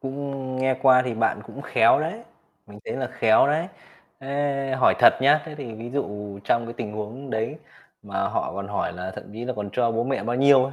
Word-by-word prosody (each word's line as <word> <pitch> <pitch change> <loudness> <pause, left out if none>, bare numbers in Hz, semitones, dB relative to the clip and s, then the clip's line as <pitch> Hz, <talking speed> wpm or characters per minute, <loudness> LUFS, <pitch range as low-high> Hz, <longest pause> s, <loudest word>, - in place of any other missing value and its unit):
cũng 135 -1 -5
nghe 130 0 +2
qua 130 -1 +6
thì 120 -3 -2
bạn 115 0 0
cũng - - -9
khéo - - +4
đấy, - - -4 0.4
mình 105 0 -13
thấy - - -4
là 130 -1 -2
khéo 110 +3 +4
đấy. 160 +4 0 0.5
Thế 140 -1 -1
hỏi - - +5
thật - - +7
nhá, 145 +2 +4
thế 155 -2 -8
thì 125 -6 -7
ví 115 +2 -8
dụ 105 -7 -4
trong 115 +2 +2
cái 115 - -7
tình 105 -2 -5
huống 115 +6 -6
đấy 110 +8 -2 0.4
mà 100 -1 -2
họ - - -2
còn 100 0 -5
hỏi 100 -3 -2
là 90 +1 -5
thậm - - -7
chí 115 +3 -6
là 130 - -2
còn 105 -1 -4
cho 120 -2 +1
bố 115 +1 0
mẹ 135 +1 -1
bao 120 +1 -1
nhiêu 135 -1 +6
ấy, 135 - -4
125 Hz, 230 wpm, -24 LUFS, 110-135 Hz, 0.5 s, thật